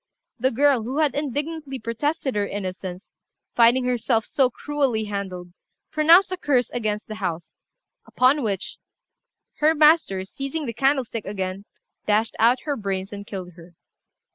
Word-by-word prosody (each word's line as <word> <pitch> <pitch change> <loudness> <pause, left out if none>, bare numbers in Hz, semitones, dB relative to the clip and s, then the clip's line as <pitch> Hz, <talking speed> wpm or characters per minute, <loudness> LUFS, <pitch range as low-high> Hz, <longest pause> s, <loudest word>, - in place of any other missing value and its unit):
The 260 +3 +2
girl, 275 0 +3
who 250 +6 -4
had 300 -4 +2
indignantly 290 0 -3
protested 260 +4 -2
her 205 -1 0
innocence, 185 -1 -6 0.4
finding 240 +2 +4
herself 240 -2 +1
so 265 -3 +2
cruelly 270 -4 -1
handled, 190 -4 -5 0.4
pronounced 335 +5 +5
a 370 - -2
curse 260 -8 +1
against 215 -3 -2
the 215 0 -8
house; 170 -3 -3 0.6
upon 265 +4 +3
which, 200 -6 -3 0.8
her 310 +2 +3
master, 300 - +4
seizing 275 +8 -5
the 230 - -4
candlestick 260 -3 0
again, 190 0 -4 0.4
dashed 215 +2 +1
out 240 +3 +4
her 295 -2 -2
brains 195 -4 -4
and 200 0 -8
killed 185 -3 -6
her. 170 0 -16
235 Hz, 140 wpm, -23 LUFS, 200-285 Hz, 0.8 s, pronounced